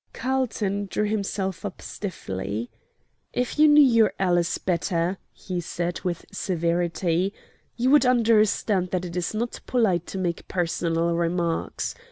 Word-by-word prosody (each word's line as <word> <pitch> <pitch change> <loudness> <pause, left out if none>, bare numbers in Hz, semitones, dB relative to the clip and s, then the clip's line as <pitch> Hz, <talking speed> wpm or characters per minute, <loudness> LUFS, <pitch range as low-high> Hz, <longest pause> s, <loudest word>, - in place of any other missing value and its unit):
Carlton 220 -6 -1
drew 210 - 0
himself 195 -3 -2
up 200 -3 -5
stiffly. 110 - -5 0.6
"If 250 +4 -2
you 305 - +8
knew 295 0 +8
your 230 -5 +4
ALICE 175 -3 +1
better," 175 0 -1
he 180 -2 -5
said, 175 +1 -3
with 175 -3 -3
severity, 175 +1 0 0.4
"you 250 +2 +2
would 290 -3 +6
understand 215 -5 +3
that 185 0 -2
it 170 -1 -7
is 180 +4 -2
not 235 +2 -2
polite 195 -9 +1
to - - -5
make 175 -3 -2
personal 170 -1 0
remarks. 170 0 -1
185 Hz, 135 wpm, -25 LUFS, 170-215 Hz, 0.6 s, you